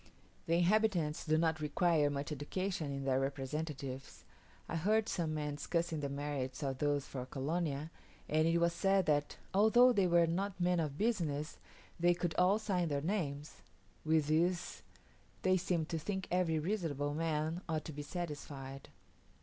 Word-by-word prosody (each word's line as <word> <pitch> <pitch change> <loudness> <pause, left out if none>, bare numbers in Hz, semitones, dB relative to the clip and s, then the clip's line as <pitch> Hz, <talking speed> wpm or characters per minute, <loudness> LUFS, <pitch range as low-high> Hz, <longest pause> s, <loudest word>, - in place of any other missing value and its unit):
The 165 - +3
inhabitants 175 -4 +2
do 155 0 +3
not 160 -1 +1
require 155 0 +2
much 145 +2 -3
education 155 +2 -3
in 140 -1 -4
their 130 -1 +2
representatives; 135 0 -4 0.4
I - - -4
heard 215 +6 +2
some 160 -4 -1
men 150 -1 -3
discussing 165 +1 -1
the 140 -1 -2
merits 140 -1 -3
of 135 -2 -2
those 145 -1 +1
for 130 -2 -5
Colonia; 150 +2 -2 0.4
and 155 +1 +2
it 165 +1 +3
was 170 0 +2
said 195 +1 +2
that, 145 -1 +1 0.2
"although 240 +5 +6
they 195 -4 +3
were 170 -1 +5
not 185 +3 -2
men 175 0 +2
of 150 -3 -2
business, 160 -10 -1 0.4
they 175 +1 +4
could 175 -2 -2
all 185 +3 +5
sign 190 -5 0
their 145 -2 -1
names:" 150 -5 -3 0.5
with 155 -1 +3
this 170 +4 0 0.6
they 185 0 +4
seemed 175 -3 0
to 165 - -1
think 190 +3 -3
every 175 -3 +2
reasonable 155 -5 -1
man 160 +1 -1
ought 155 -2 -1
to 160 - -6
be 145 - -5
satisfied. 145 -4 -6
160 Hz, 160 wpm, -35 LUFS, 145-180 Hz, 0.6 s, although